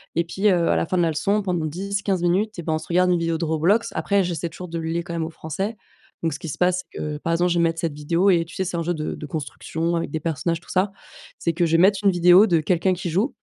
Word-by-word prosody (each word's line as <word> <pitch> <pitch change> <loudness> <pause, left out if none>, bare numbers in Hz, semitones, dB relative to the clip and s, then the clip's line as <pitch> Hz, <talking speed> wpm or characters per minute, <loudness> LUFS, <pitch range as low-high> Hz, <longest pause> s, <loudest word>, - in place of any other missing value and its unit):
et 170 - +2
puis, 190 +5 -1
heu, 175 -3 +2
à - - +3
la - - +1
fin 185 - -2
de - - +3
la 165 - +2
leçon 200 +7 +1
pendant 175 -4 -1
10-15 195 +3 -2
minutes 195 +5 +1
et - - -5
ben 160 - -2
on - - +1
se 160 - -11
regarde 180 +1 +3
une 175 - +2
vidéo 165 -1 0
de 165 - -2
Roblox». 170 +9 +2
Après, 200 -1 +1
j'essaie 170 -2 -3
toujours 180 +2 -9
de 165 0 -4
le 160 - -4
lier, 170 +1 -1
quand 170 0 -7
même, 165 -1 -1
au - - -5
français. 190 +7 -4 0.5
Donc 165 - +1
ce - - -6
qui - - -7
se - - -5
passe, 180 +1 +1
c'est - - -8
que, 150 -1 -3
par 165 +3 -2
exemple, 175 +1 +2
je 175 - +2
vais - - +3
mettre 165 0 0
cette 165 -3 -1
vidéo 165 +6 +1
et 170 -3 +3
tu 165 - -13
sais, 190 - -1
c'est 175 -1 -3
un - - -1
jeu 175 +2 0
de 155 -2 -3
de - - -7
construction 160 +3 -3
avec 165 - -2
des 160 - -2
personnages 165 +2 -2
tout - - -20
ça 190 +2 +1 0.5
c'est 170 - 0
que 170 +1 +1
je 165 - -1
vais - - +4
mettre 195 +1 +5
une 200 - +5
vidéo 180 +3 +6
de 170 -5 +3
quelqu'un 180 +3 +1
qui 180 0 -4
joue 215 - 0
170 Hz, 310 wpm, -23 LUFS, 165-185 Hz, 0.5 s, vidéo